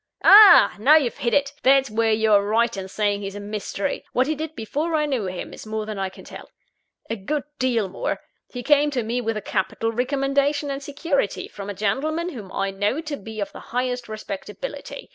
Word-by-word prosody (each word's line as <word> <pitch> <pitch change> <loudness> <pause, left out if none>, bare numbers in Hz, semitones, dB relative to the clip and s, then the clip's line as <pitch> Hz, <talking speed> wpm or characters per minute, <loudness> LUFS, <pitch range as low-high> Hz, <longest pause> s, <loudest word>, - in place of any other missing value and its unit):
"Ah! 400 - +9
now 280 +8 +6
you've 275 -7 +1
hit 235 - 0
it 280 +2 +1
that's 270 -2 +4
where 225 +1 +1
you're 215 -2 +4
right 230 +3 +1
in 190 -1 -5
saying 205 +1 -1
he's 195 0 -6
a - - -5
mystery. 205 -1 -4
What 255 - +3
he 310 - 0
did 315 +1 -6
before 295 +9 -2
I 300 -1 +2
knew 255 -9 -1
him, 180 -1 -6
is - - -10
more 215 0 -3
than 215 -2 -5
I 190 -1 -1
can 190 - -14
tell - - -11 0.6
a 225 - -2
good 265 +8 -3 0.2
deal 240 -5 +1
more. 190 - -3 0.3
He 245 -1 -6
came 295 +2 +4
to 255 -5 -2
me 235 +3 -2
with 225 -2 -2
a - - -4
capital 210 +4 -1
recommendation 275 +4 0
and 275 0 -4
security, 285 - -2
from 200 0 -8
a 205 - -5
gentleman 305 - -1
whom 215 - -9
I 195 0 -2
knew 205 +11 -1
to 305 -2 -4
be 220 -3 -9
of 200 - -3
the - - -10
highest 250 -1 -3
respectability. 215 - -7
235 Hz, 210 wpm, -23 LUFS, 205-285 Hz, 0.6 s, Ah